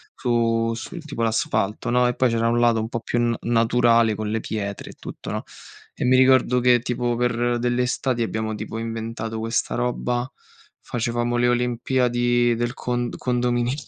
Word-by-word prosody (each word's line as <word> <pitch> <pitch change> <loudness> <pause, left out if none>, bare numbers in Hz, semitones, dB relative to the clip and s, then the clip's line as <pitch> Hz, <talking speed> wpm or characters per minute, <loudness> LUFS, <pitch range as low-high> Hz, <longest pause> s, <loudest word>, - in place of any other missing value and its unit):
su 115 -2 +1
su, 120 +9 -7
tipo, 150 -7 -4
l'asfalto, 110 -2 0
no, 125 +1 +3
e 125 - 0
poi 130 - +2
c'era 115 0 +1
un 120 +1 +2
lato 120 -1 +3
un 110 +1 -3
po' 115 - -3
più 120 - -2
na 120 -1 +1
naturale, 115 -1 +3
con 110 0 -3
le 110 +1 -1
pietre 100 -2 -5
e - - -14
tutto, - - -8
no. - - -3 0.5
E - - -2
mi 130 +1 +4
ricordo 130 -1 +4
che, 125 0 +4
tipo, 120 0 -1
per 120 0 0
delle 120 +1 +1
estati 125 0 -1
abbiamo, 110 0 -2
tipo, 110 +1 -6
inventato 115 0 -4
questa 115 +1 -1
roba, 125 +1 -1 0.5
facevamo 120 0 -1
le 120 0 +3
olimpiadi 120 0 +1
del 120 +1 -2
con 120 -1 -2
condominio. 120 0 0
120 Hz, 175 wpm, -23 LUFS, 115-125 Hz, 0.5 s, mi